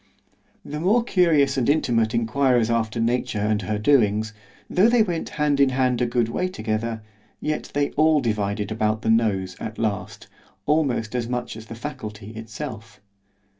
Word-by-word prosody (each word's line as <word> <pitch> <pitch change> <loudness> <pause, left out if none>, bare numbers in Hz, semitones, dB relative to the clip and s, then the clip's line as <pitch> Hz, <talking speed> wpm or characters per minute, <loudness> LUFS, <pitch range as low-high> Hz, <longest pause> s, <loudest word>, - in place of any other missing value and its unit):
The 150 +1 -5
more 210 +8 +3
curious 155 - +3
and 125 - +1
intimate 120 -6 +2
inquirers 120 0 +2
after 115 0 0
nature 120 0 0
and 105 +1 0
her 105 +2 -2
doings, 110 -3 +2 0.3
though 200 +6 +4
they 235 -2 +4
went 175 -5 -3
hand 150 -2 +1
in 140 -1 +5
hand 130 -2 +1
a 120 - +2
good 120 -1 +1
way 180 +11 -1
together, 110 -7 -3 0.4
yet 155 0 -3
they 145 0 +1
all 155 0 +3
divided 105 -4 -1
about 110 0 0
the 110 - +2
nose 100 -5 +1
at 110 0 -6
last, 110 -3 -3 0.4
almost 140 -7 +1
as 120 -2 -2
much 125 -2 -3
as 110 0 -10
the 115 - -8
Faculty 110 -5 -7
itself. 110 -1 -8
115 Hz, 165 wpm, -23 LUFS, 110-140 Hz, 0.4 s, in